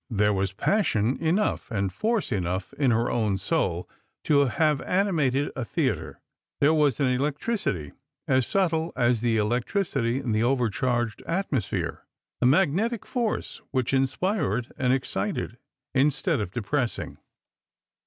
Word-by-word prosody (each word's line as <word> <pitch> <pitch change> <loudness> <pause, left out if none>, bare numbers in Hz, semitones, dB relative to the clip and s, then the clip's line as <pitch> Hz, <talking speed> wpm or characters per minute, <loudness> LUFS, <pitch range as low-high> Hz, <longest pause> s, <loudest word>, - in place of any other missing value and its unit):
There 105 -2 +2
was 95 0 0
jjassion 120 - +1
enough 170 +6 0
and 100 -5 -1
force 220 - 0
enough 95 -2 -2
in 140 -3 +1
her 115 0 +2
own 105 -5 +1
soul 95 - -1 0.4
to 140 -2 +4
have 150 +2 +1
animated 155 -8 +1
a 130 - -2
theatre; 110 - -2 0.4
there 145 +2 +4
was 150 -6 +2
an 140 - +3
electricity 135 - -1 0.4
as 130 -2 +2
subtle 165 -4 +1
as 120 -2 +2
the 115 -2 +2
electricity 120 - 0
in 130 -4 -2
the 110 0 +2
overcharged 120 -1 0
atmosphere, 165 - -2 0.4
a - - +5
magnetic 195 - +2
force 240 -4 -2
which 130 -1 -1
inspired 135 - 0
and 125 -1 +1
excited, 135 - -2 0.3
instead 145 +3 +2
of 100 - -3
depressing. 120 +4 -2
130 Hz, 130 wpm, -26 LUFS, 115-160 Hz, 0.4 s, a